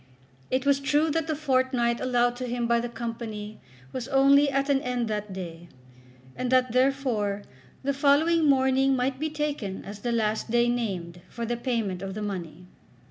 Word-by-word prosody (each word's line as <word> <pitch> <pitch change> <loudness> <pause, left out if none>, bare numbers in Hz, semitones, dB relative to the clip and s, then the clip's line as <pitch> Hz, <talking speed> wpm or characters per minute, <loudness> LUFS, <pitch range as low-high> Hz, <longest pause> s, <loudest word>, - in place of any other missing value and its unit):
It 260 +1 0
was 280 -1 +4
true 295 +3 +2
that 325 +1 -1
the 310 - 0
fortnight 255 -5 +1
allowed 245 -1 +2
to 250 0 -4
him 240 0 -1
by 235 0 +3
the 240 +1 -3
Company 225 -3 -6 0.3
was 255 -1 -4
only 275 +1 +5
at 275 0 0
an 275 -1 +2
end 250 -2 -1
that 210 -1 -3
day, 175 -2 -7 0.7
and 255 0 -2
that, 255 -1 +3
therefore, 250 -6 +1 0.4
the 280 +1 0
following 300 +3 +3
morning 265 0 +3
might 260 +1 -1
be 310 +1 -1
taken 295 -10 -3
as 205 +1 -8
the 240 +3 -2
last 220 -1 0
day 240 +1 +3
named 185 -8 -3
for 235 - -5
the 240 +1 -1
payment 230 -7 -2
of 195 0 -5
the 215 - -4
money. 180 -4 -5
245 Hz, 180 wpm, -26 LUFS, 215-275 Hz, 0.7 s, only